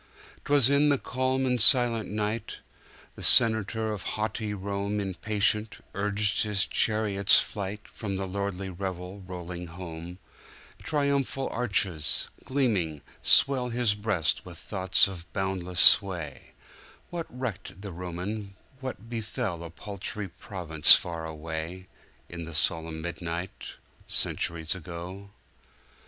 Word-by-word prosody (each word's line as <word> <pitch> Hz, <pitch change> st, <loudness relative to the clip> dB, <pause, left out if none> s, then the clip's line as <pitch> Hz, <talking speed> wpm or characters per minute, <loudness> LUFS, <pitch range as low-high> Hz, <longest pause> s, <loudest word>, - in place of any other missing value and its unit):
'Twas 145 Hz, -4 st, +5 dB
in 140 Hz, +2 st, +4 dB
the 140 Hz, -, +3 dB
calm 130 Hz, +1 st, -1 dB
and 125 Hz, -2 st, +2 dB
silent 115 Hz, -2 st, +5 dB
night! 105 Hz, +2 st, -3 dB, 0.6 s
The -, -, -12 dB
senator 110 Hz, -1 st, +4 dB
of 105 Hz, -, -5 dB
haughty 110 Hz, +1 st, -3 dB
RomeImpatient, 100 Hz, +1 st, -1 dB
urged 105 Hz, +1 st, +1 dB
his 105 Hz, -3 st, +2 dB
chariot's 105 Hz, -2 st, +3 dB
flight, 100 Hz, +1 st, -5 dB
From 100 Hz, -3 st, -5 dB
lordly 95 Hz, 0 st, -3 dB
revel 95 Hz, +1 st, -5 dB
rolling 90 Hz, -1 st, -6 dB
home:Triumphal 95 Hz, -, -4 dB
arches, 95 Hz, -9 st, +2 dB, 0.2 s
gleaming, 100 Hz, -, 0 dB, 0.2 s
swell 130 Hz, -3 st, +4 dB
His 120 Hz, -3 st, +1 dB
breast 105 Hz, -6 st, 0 dB
with -, -, -11 dB
thoughts 95 Hz, +2 st, +2 dB
of 85 Hz, -3 st, -9 dB
boundless 95 Hz, -2 st, -2 dB
sway:What 95 Hz, -, +1 dB
recked 115 Hz, -7 st, -6 dB
the 100 Hz, -, -6 dB
Roman 90 Hz, +4 st, -5 dB, 0.2 s
what 130 Hz, -5 st, -7 dB
befell 110 Hz, -6 st, -4 dB
A 85 Hz, -, -7 dB
paltry 100 Hz, +4 st, -6 dB
province 85 Hz, -4 st, +4 dB
far 85 Hz, -2 st, -4 dB
away, 80 Hz, +3 st, -5 dB, 0.4 s
In 85 Hz, -1 st, -7 dB
the 80 Hz, -1 st, -7 dB
solemn 80 Hz, -1 st, 0 dB
midnight, 85 Hz, +1 st, -5 dB, 0.3 s
Centuries 80 Hz, -2 st, 0 dB
ago? 90 Hz, +3 st, -8 dB
100 Hz, 110 wpm, -28 LUFS, 90-110 Hz, 0.6 s, Twas